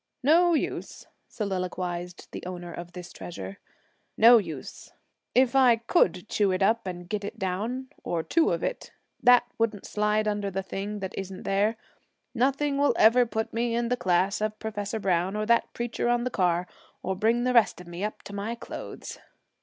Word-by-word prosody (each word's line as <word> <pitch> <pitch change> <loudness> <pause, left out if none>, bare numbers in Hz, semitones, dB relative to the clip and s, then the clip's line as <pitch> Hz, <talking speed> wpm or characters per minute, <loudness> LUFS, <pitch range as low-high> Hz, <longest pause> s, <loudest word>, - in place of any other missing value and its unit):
'No 340 +4 +5
use,' - - -3 0.2
soliloquized 180 -3 -4
the - - -7
owner 175 -2 -6
of 175 0 -8
this 180 -1 -9
treasure, 95 - -8 0.6
'no 235 +1 +8
use. 160 -9 -8 0.4
If 255 +1 +4
I 255 -3 +6
could 215 - +1
chew 205 -2 +1
it 185 +1 +1
up 225 +1 +2
and 175 -1 -6
get 210 +1 -3
it 200 - -6
down, 220 +8 -3
or 165 -2 -1
two 330 - +2
of - - -1
it, - - -3 0.3
that 245 0 +7 0.2
wouldn't 225 -3 0
slide 210 0 +1
under 205 -1 -1
the 195 0 -3
thing 205 +2 -5
that 190 -1 -4
isn't 195 -1 -6
there. 205 +3 +1 0.6
Nothing 275 +3 +1
will 285 - +3
ever 240 +2 +6
put 220 0 -3
me 230 0 0
in 235 0 0
the 250 - +2
class 190 -1 +1
of 215 0 -1
Professor 220 0 -4
Browne 185 0 0
or 215 0 -1
that 235 +1 +2
preacher 240 0 -2
on 240 0 +2
the 250 - -2
car, 180 -3 +1 0.4
or 190 +1 -1
bring 230 +5 +2
the 250 0 +1
rest 235 -6 +4
of 180 - -10
me 175 +2 -6
up 210 - -4
to 205 - -9
my 205 +3 -3
clothes.' - - -8
210 Hz, 185 wpm, -27 LUFS, 185-235 Hz, 0.6 s, no